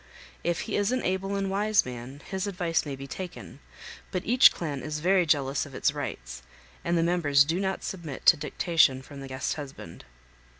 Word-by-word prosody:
If 170 Hz, -1 st, 0 dB
he -, -, -3 dB
is 205 Hz, +2 st, +1 dB
an 255 Hz, -, 0 dB
able 190 Hz, +2 st, -1 dB
and 195 Hz, 0 st, -1 dB
wise 205 Hz, +2 st, +2 dB
man 125 Hz, +3 st, -8 dB
his 190 Hz, +1 st, -3 dB
advice 175 Hz, -5 st, -1 dB
may 140 Hz, -, -4 dB
be 135 Hz, +1 st, -8 dB
taken, 180 Hz, +5 st, -8 dB, 0.5 s
but 185 Hz, -2 st, -3 dB
each 245 Hz, +3 st, +7 dB
clan 145 Hz, -5 st, -4 dB
is 150 Hz, +4 st, -4 dB
very 180 Hz, +1 st, +3 dB
jealous 140 Hz, -2 st, +1 dB
of 135 Hz, -, -12 dB
its -, -, +1 dB
rights, -, -, -6 dB, 0.4 s
and 170 Hz, 0 st, +1 dB
the 165 Hz, -, +2 dB
members 150 Hz, -5 st, +4 dB
do 165 Hz, +5 st, -1 dB
not 190 Hz, -1 st, -2 dB
submit 165 Hz, -8 st, -6 dB
to -, -, +8 dB
dictation 145 Hz, -2 st, +2 dB
from 140 Hz, 0 st, -10 dB
the 135 Hz, -, -7 dB
guest 130 Hz, +3 st, -3 dB
husband. 145 Hz, -3 st, -9 dB
165 Hz, 195 wpm, -27 LUFS, 140-190 Hz, 0.5 s, to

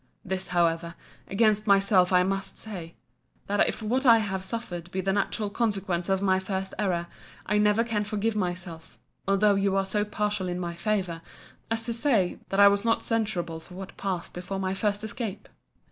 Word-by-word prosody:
This, 190 Hz, 0 st, -2 dB
however, 170 Hz, -1 st, +1 dB, 0.3 s
against 215 Hz, +1 st, +2 dB
myself 195 Hz, -2 st, +4 dB
I 180 Hz, -1 st, +5 dB
must 195 Hz, +1 st, -2 dB
say, 180 Hz, -6 st, -6 dB, 0.5 s
That 205 Hz, 0 st, +2 dB
if -, -, -3 dB
what 250 Hz, +5 st, 0 dB
I 235 Hz, -4 st, +8 dB
have 195 Hz, -4 st, -2 dB
suffered 185 Hz, -5 st, -4 dB
be 190 Hz, -, -3 dB
the 195 Hz, +1 st, 0 dB
natural 205 Hz, +1 st, -1 dB
consequence 195 Hz, -6 st, -1 dB
of 190 Hz, 0 st, +1 dB
my 190 Hz, -1 st, +3 dB
first 190 Hz, 0 st, -3 dB
error, 180 Hz, -4 st, 0 dB, 0.4 s
I 210 Hz, +1 st, +2 dB
never 210 Hz, +2 st, +4 dB
can 225 Hz, -3 st, -1 dB
forgive 215 Hz, +1 st, -1 dB
myself, 175 Hz, -4 st, -4 dB, 0.3 s
although 200 Hz, +1 st, +4 dB
you 195 Hz, 0 st, +1 dB
are 195 Hz, 0 st, +2 dB
so 205 Hz, +2 st, 0 dB
partial 210 Hz, -2 st, -2 dB
in 180 Hz, 0 st, -3 dB
my 170 Hz, -1 st, -3 dB
favour, 175 Hz, -2 st, -1 dB, 0.5 s
as 225 Hz, 0 st, +1 dB
to 235 Hz, -, 0 dB
say, 230 Hz, -7 st, +1 dB
that 195 Hz, -, 0 dB
I 200 Hz, -, +9 dB
was 200 Hz, 0 st, +3 dB
not 230 Hz, -1 st, +1 dB
censurable 205 Hz, -8 st, -1 dB
for 180 Hz, +3 st, -14 dB
what 195 Hz, 0 st, -8 dB
passed 185 Hz, -3 st, -3 dB
before 180 Hz, +2 st, -5 dB
my 190 Hz, 0 st, -1 dB
first 205 Hz, +1 st, -1 dB
escape. 220 Hz, -1 st, -5 dB
195 Hz, 185 wpm, -27 LUFS, 180-210 Hz, 0.5 s, I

